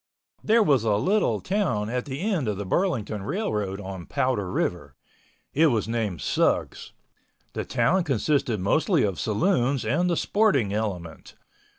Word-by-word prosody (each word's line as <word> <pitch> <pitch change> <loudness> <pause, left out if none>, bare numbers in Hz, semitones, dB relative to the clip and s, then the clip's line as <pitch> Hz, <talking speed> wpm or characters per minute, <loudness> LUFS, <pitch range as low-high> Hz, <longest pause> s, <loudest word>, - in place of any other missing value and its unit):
There 225 +1 +4
was 140 - +3
a 110 -2 +2
little 195 - +1
town 180 - -1
established 120 - -4
at - - -8
the 140 +2 -5
end 190 - 0
of 105 -2 -1
the 100 - -4
Burlington 110 - -1
Railroad 105 - -2
on 95 -3 -7
Powder 105 -8 -1
River. 75 -7 -2 0.6
It 160 +3 +4
was 115 -7 0
named 110 - -2
Sugs. - - 0 0.6
The - - -4
town 185 +1 +1
consisted 140 - 0
mostly 155 - +2
of 100 -3 -1
saloons 135 - +1
and 180 +1 +1
the 170 - +1
sporting 190 - +2
element. 95 -7 -4
120 Hz, 155 wpm, -25 LUFS, 100-170 Hz, 0.6 s, There